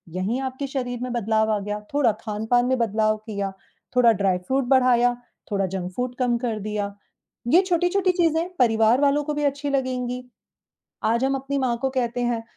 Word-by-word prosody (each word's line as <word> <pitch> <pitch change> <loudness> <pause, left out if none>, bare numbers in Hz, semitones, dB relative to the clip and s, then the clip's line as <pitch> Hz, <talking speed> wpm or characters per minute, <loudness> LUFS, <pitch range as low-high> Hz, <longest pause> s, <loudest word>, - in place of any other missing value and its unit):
यहीं 210 +8 -1
आपके 265 +1 -4
शरीर 245 -3 -3
में 250 - -3
बदलाव 220 -1 +1
आ 210 - 0
गया, 210 +1 -4
थोड़ा 275 -6 +3
खान-पान 220 +3 0
में 260 +1 +1
बदलाव 215 -1 +1
किया, 200 -2 -3 0.4
थोड़ा 235 -2 +6
ड्राई 195 -3 +1
फ्रूट 265 0 +1
बढ़ाया, 245 -1 +4 0.4
थोड़ा 195 -1 +1
जंक 185 -1 -4
फूड 250 0 -2
कम 245 -1 +2
कर 230 -3 -2
दिया। 205 -1 -3 0.6
ये 360 - +8
छोटी-छोटी 360 +2 +2
चीज़ें 335 -1 +1
परिवार 225 +1 +4
वालों 290 +1 +3
को 300 - -2
भी 295 0 -2
अच्छी 285 0 -1
लगेंगी। 250 -2 -2 0.8
आज 235 +3 +1
हम 270 0 +1
अपनी 275 +1 -3
माँ 250 -3 0
को 270 - +1
कहते 245 -2 -1
हैं 235 -1 -1
245 Hz, 180 wpm, -24 LUFS, 220-270 Hz, 0.8 s, ये